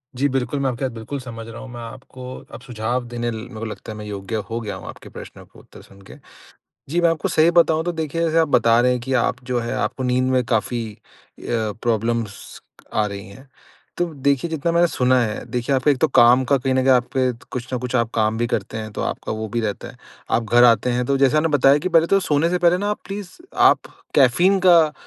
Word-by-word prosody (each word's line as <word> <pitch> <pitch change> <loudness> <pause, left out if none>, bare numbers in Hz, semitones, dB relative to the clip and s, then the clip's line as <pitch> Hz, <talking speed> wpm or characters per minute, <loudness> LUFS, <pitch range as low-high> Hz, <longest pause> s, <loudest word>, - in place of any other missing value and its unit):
जी 135 +3 +1
बिल्कुल 130 +1 -2
मैं 135 -1 0
आपकी 125 +1 -5
बात 130 - -3
बिल्कुल 115 +5 -6
समझ 115 -3 -8
रहा 115 0 -9
हूँ। 130 - -10
मैं 120 -1 -8
आपको 125 +2 -11 0.3
अब - - -9
सुझाव 120 +1 -3
देने 120 0 -2
ल 115 - -5
मेरे 110 - -9
को 115 - -4
लगता 110 0 -7
है 105 - -8
मैं 105 - -8
योग्य 100 +1 -5
हो 115 - -3
गया 105 - -5
हूँ - - -10
आपके - - -11
प्रश्नों - - -11
के - - -19
उत्तर - - -16
सुन 100 0 -18
के। - - -10 0.8
जी 170 +3 +1
मैं 170 - +4
आपको 160 -3 -2
सही 160 +2 +4
बताऊँ 165 -2 +3
तो 175 - -1
देखिए 160 0 -3
जैसे 165 0 +1
आप 160 -2 +3
बता 115 -3 +4
रहे 125 +1 +3
हैं 125 - -2
कि 130 +3 -5
आप 120 - +1
जो 125 -1 -1
है 115 - -4
आपको 130 - -2
नींद 125 0 +1
में 130 -1 +2
काफ़ी 115 0 -1
अ, - - -24 0.4
प्रॉब्लम्स 115 -2 -2 0.3
आ 105 - +2
रही 100 -2 -7
हैं। 130 +8 -15 0.5
तो 175 - +1
देखिए 140 +3 0
जितना 160 +1 -1
मैंने 170 +1 +4
सुना 130 -3 +2
है 110 -3 -2
देखिए 125 +3 -1
आप 130 +2 -1
एक 140 -3 +3
तो - - +4
काम 125 -1 +5
का - - +6
कहीं 130 +1 -1
न - - +1
कहीं 135 - +4
आप 125 -1 +2
पे 130 -1 +2 0.2
कुछ 125 +1 -6
न - - -1
कुछ 125 +1 -5
आप 115 -1 0
काम 110 0 +1
भी 120 - 0
करते 110 -2 -3
हैं 110 0 -6
तो - - -4
आपका - - -4
वो 110 0 -4
भी 115 +3 -2
रहता 105 -3 -4
है। - - -13 0.3
आप 115 - +1
घर 120 0 +7
आते 120 +1 +4
हैं 125 0 0
तो 140 - +1
जैसा 135 +2 +3
आपने 165 +1 +2
बताया 140 -1 +4
कि 150 - -2
पहले 165 -2 +4
तो 195 - +3
सोने 155 -1 +1
से 180 - 0
पहले 175 0 +3
ना 205 +2 -2
आप 210 - -2
प्लीज़ 200 -2 -6 0.2
आप - - +5 0.4
कैफ़ीन 150 +9 +4
का 165 -4 +6
125 Hz, 255 wpm, -21 LUFS, 115-145 Hz, 0.8 s, घर